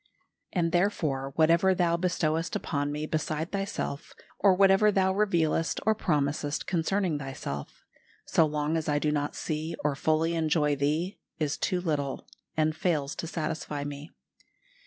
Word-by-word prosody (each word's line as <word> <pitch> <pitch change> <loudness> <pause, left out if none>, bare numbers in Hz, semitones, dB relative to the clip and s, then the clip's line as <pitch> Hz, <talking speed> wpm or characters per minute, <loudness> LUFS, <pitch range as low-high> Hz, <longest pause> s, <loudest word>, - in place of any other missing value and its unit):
"And 170 -3 +1
therefore 155 -8 0
whatever 170 +4 +4
Thou 175 -2 +2
bestowest 170 -2 0
upon 145 -1 -1
me 150 +1 -3
beside 155 +1 -2
Thyself, 195 -7 -3 0.3
or 195 -2 +5
whatever 195 +2 +5
Thou 190 -1 +2
revealest 170 -5 +1
or 220 - +5
promisest 145 -6 -1
concerning 175 -2 0
Thyself, 130 - -6 0.4
so 160 - +3
long 150 +1 -1
as 155 -1 -2
I 145 - +2
do 150 +1 +1
not 145 -1 -1
see 155 +1 -3
or 145 -1 +1
fully 160 +3 +1
enjoy 155 -2 +2
Thee, 155 +7 -1 0.2
is 150 -3 0
too 185 -3 0
little, 145 -6 -2 0.3
and 155 0 +2
fails 155 -5 0
to 165 - -4
satisfy 155 -3 -3
me. 145 +2 -7
160 Hz, 145 wpm, -28 LUFS, 150-175 Hz, 0.4 s, or